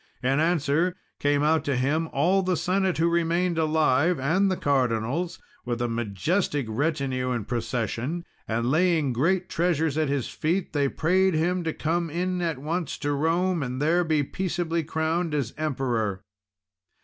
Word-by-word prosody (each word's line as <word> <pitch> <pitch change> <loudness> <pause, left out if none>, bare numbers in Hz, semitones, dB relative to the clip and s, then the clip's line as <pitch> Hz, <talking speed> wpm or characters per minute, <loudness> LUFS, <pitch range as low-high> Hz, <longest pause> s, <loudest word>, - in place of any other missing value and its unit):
In 135 +3 +2
answer, 165 +1 +1 0.2
came 145 0 +2
out 155 0 +3
to 140 - 0
him 150 +6 0
all 180 +8 +2
the 185 -2 0
Senate 190 0 0
who 165 +1 +3
remained 170 0 +1
alive, 155 0 +2
and 180 +9 +2
the 185 - 0
Cardinals, 135 +4 0 0.3
with 120 -1 -3
a 120 - 0
majestic 120 - -1
retinue 130 +1 -1
and 120 -5 -2
procession; 120 - -2 0.2
and 115 +2 0
laying 160 -4 +2
great 175 +9 +1
treasures 160 -3 0
at 155 -3 +1
his 140 -3 -1
feet, 175 +4 -2
they 140 -2 +2
prayed 185 +4 +2
him 175 +3 +1
to 160 - 0
come 165 +2 -1
in 180 +3 -1
at 165 -4 -1
once 160 +4 -3
to 145 - -2
Rome, 165 +4 +1
and 130 -1 -3
there 165 +5 +3
be 155 -3 +1
peaceably 170 0 -2
crowned 160 +1 -1
as 135 -5 -2
Emperor. 120 -10 -1
155 Hz, 160 wpm, -26 LUFS, 135-175 Hz, 0.3 s, out